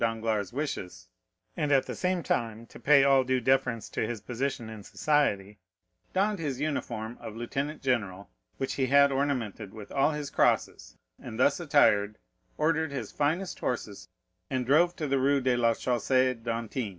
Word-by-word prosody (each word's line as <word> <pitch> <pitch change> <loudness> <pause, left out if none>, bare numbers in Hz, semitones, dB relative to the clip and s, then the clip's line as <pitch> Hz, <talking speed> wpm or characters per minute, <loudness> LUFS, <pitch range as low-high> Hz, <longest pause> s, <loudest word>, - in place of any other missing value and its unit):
Danglars' 110 -3 -1
wishes, 135 -9 -5 0.5
and 150 -3 -1
at 135 -2 +4
the - - -5
same 180 -2 -1
time 115 -3 -2
to - - -14
pay 140 -1 +5
all 135 -1 +5
due 130 0 +1
deference 125 -2 +1
to - - -3
his 120 -1 -4
position 125 +2 -3
in 110 -1 -8
society, 105 -6 0 0.5
donned 200 +1 +1
his 140 -5 -3
uniform 120 -6 -3
of 110 - -8
lieutenant 140 +6 -4
general, 100 -7 -1 0.3
which 135 - -2
he 130 -2 -1
ornamented 135 -7 +2
with 105 -2 -10
all 135 +2 +3
his 150 -1 -5
crosses, - - 0 0.2
and 110 - -8
thus 140 +4 +3
attired, 105 -10 +3 0.4
ordered 160 0 +1
his 140 - -5
finest 165 +6 -1
horses 110 -7 -4 0.4
and 130 -1 -1
drove 165 +7 +4
to 155 - -3
the 135 0 +1
Rue 140 +2 +3
de 130 -1 +1
la 115 -1 +3
Chaussée 130 +2 +1
d'Antin. 115 0 -3
130 Hz, 160 wpm, -28 LUFS, 115-145 Hz, 0.5 s, pay